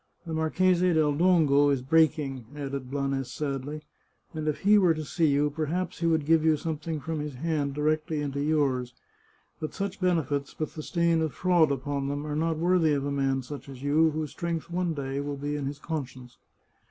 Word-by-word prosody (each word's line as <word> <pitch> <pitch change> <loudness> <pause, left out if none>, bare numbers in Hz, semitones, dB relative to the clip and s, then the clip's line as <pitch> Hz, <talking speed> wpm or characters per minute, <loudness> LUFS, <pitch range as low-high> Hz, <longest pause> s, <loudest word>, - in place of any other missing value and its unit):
The 165 - -5
Marchese 180 +3 +2
del 155 -2 +3
Dongo 150 -4 +4
is 135 -3 0
breaking," 145 -4 +2
added 140 -3 -5
Blanes 135 -2 -2
sadly, 145 +1 -4 0.3
" - - -40
and 155 -1 -4
if 150 - -1
he 205 +1 +6
were 175 -4 +4
to 155 0 -5
see 165 +2 +1
you, 145 +1 +2
perhaps 160 +4 -2
he 170 - +1
would 160 -3 +2
give 160 0 +4
you 160 -1 +4
something 155 0 -4
from 160 +1 -4
his 150 -2 -5
hand 145 -1 -1
directly 155 +1 0
into 140 -1 -2
yours. 135 -5 0 0.6
But 155 - -5
such 200 0 -4
benefits, 145 -6 0
with 155 - -3
the 155 - -6
stain 170 0 +1
of 160 -3 -2
fraud 175 -5 +3
upon 140 +1 -2
them, 145 +1 -3
are 150 -1 -3
not 160 +1 0
worthy 170 -2 +3
of 140 -1 -1
a 145 - -2
man 135 -1 0
such 140 +2 -8
as 135 -1 -10
you, 155 +3 +4
whose 155 -1 -3
strength 170 -1 -4
one 175 -2 -1
day 135 -1 -3
will 145 0 -4
be 145 +1 -3
in 145 -2 -3
his 140 +1 -5
conscience. 130 -5 -6
150 Hz, 200 wpm, -27 LUFS, 140-160 Hz, 0.6 s, he